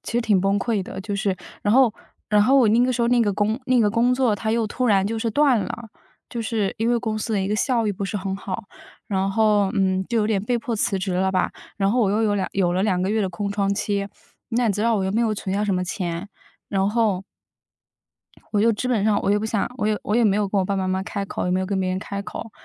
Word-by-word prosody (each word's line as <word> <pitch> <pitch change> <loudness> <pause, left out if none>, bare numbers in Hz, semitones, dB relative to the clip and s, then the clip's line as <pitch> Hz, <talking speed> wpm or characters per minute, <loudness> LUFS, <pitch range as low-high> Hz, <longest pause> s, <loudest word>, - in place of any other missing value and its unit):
其 - - -6
实 240 - +2
挺 205 -5 +3
崩 195 +1 +2
溃 210 -1 -1
的， 190 - -8
就 205 - -4
是 195 -2 0 0.3
然 205 +2 +2
后 255 -5 +5 0.4
然 210 -1 +5
后 265 +5 +4
我 250 -4 +5
那 230 +3 +4
个 255 - +1
时 240 0 0
候 235 - +2
那 245 0 +4
个 205 - +1
工 210 +5 0
那 255 -1 +3
个 210 -2 +3
工 240 +3 +2
作， 250 -5 +2
它 220 +2 -2
又 230 -1 +1
突 250 +4 -2
然 195 -3 +3
就 225 +1 -2
是 225 0 -1
断 275 -1 +3
了， 225 +4 -6 0.4
就 235 -1 -3
是 215 -3 -1
因 230 +2 +1
为 240 - +2
公 220 -1 -2
司 225 - -3
的 200 - +1
一 190 - -1
个 210 - 0
效 235 -2 +1
益 205 - +1
不 195 +1 -4
是 205 +2 -3
很 190 0 -3
好， 195 -1 -5 0.4
然 195 -1 0
后， 210 -2 +3
嗯， 190 -1 +1
就 235 -1 +1
有 210 - +2
点 205 -3 0
被 240 +2 0
迫 230 0 -3
辞 200 -2 0
职 185 0 -2
了 190 +1 +1
吧。 185 - 0 0.2
然 195 -1 +1
后， 245 - +2
我 200 -4 +2
又 215 +2 +1
有 205 -2 +2
2 190 - -1
有 180 -3 +1
了 185 - +1
2 190 -3 +1
个 190 - 0
月 220 -1 +1
的 190 - 0
空 200 +3 -3
窗 200 -1 0
期， 200 -1 -1 0.4
那 235 0 +1
你 - - +2
知 210 - -1
道 230 -1 +2
我 190 - -1
又 190 - -1
没 225 - +1
有 220 - +1
存 195 -1 -4
下 205 - 0
什 200 - 0
么 180 0 -1
钱。 175 +1 -4 0.4
然 195 -1 +1
后 210 -5 +1 1.3
我 205 - +2
就 230 - +4
基 235 +4 -3
本 220 -5 +1
上， 210 -2 +2
我 - - +1
也 205 - +3
不 210 - -4
想 215 -2 -1
我 210 - 0
也 215 -1 +1
我 210 - -1
也 235 0 +4
没 200 -1 +3
有 205 -2 0
跟 200 - 0
我 190 - +2
爸 195 +1 -1
爸 190 - -1
妈 185 - -1
妈 190 0 0
开 200 -1 -4
口， - - -4
也 - - 0
没 185 +1 +1
有 185 - -2
跟 195 -1 -1
别 185 - -1
人 185 - -1
开 200 +1 -5
口。 220 - -7
205 Hz, 315 characters per minute, -23 LUFS, 195-225 Hz, 1.3 s, 后